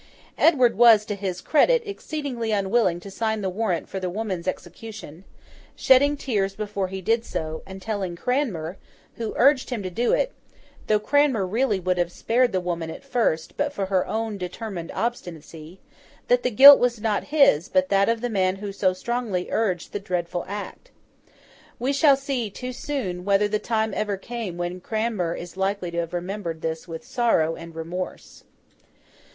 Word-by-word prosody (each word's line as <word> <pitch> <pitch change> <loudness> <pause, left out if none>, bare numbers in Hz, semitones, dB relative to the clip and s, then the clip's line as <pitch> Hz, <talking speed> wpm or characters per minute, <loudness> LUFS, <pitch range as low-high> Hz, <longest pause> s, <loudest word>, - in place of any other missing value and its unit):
Edward 255 -8 +4
was, 225 -3 +7
to 210 - -3
his 190 -3 -4
credit, 475 - +3
exceedingly 285 - -4
unwilling 200 -3 +1
to 200 - -10
sign 220 +1 -1
the 190 -1 -2
warrant 185 -3 -1
for 190 - -5
the 185 -1 -3
woman's 190 -3 -4
execution: 185 -1 -7 0.5
shedding 285 +3 +4
tears 200 -8 -1
before 205 -2 -3
he 190 +1 -6
did 225 +4 +2
so, 160 -7 -4
and 190 0 -9
telling 195 -5 -3
Cranmer, 200 - -2 0.4
who 230 -2 -4
urged 270 +1 +4
him 235 -6 -3
to 185 - -4
do 235 +7 0
it - - +1 0.6
(though 215 -1 +3
Cranmer 265 -3 +2
really 215 +1 0
would 180 0 -1
have 175 0 0
spared 245 +5 +1
the 190 - 0
woman 170 -2 -3
at - - -8
first, 235 -12 -1
but 290 0 0
for 200 -8 -3
her 190 -1 0
own 220 -2 -3
determined 180 -1 -6
obstinacy), 170 -6 -5 0.5
that 245 0 +4
the 250 - 0
guilt 275 +5 +10
was 245 -2 +1
not 210 -1 -1
his, 275 - +4
but 280 0 +2
that 195 +1 +3
of 230 -1 0
the 245 - -1
man 185 -2 +1
who 200 +1 -6
so 190 -1 +1
strongly 215 -2 -3
urged 190 -6 -1
the 205 - -2
dreadful 180 -2 -3
act. 205 - -7 0.9
We 260 +4 -1
shall 280 -1 +5
see, 270 -5 -3
too 250 +5 -6
soon, 215 -11 -4
whether 200 +1 +3
the 210 0 -1
time 220 -2 -1
ever 210 -1 -1
came 220 -4 -6
when 175 +1 -4
Cranmer 215 -5 -1
is 175 0 -8
likely 190 -2 -1
to 170 - -2
have 170 0 -4
remembered 175 -2 -4
this 160 +1 -3
with 165 +6 -8
sorrow 235 -11 +1
and 165 -1 -10
remorse. 170 +3 -6
205 Hz, 175 wpm, -24 LUFS, 180-240 Hz, 0.9 s, guilt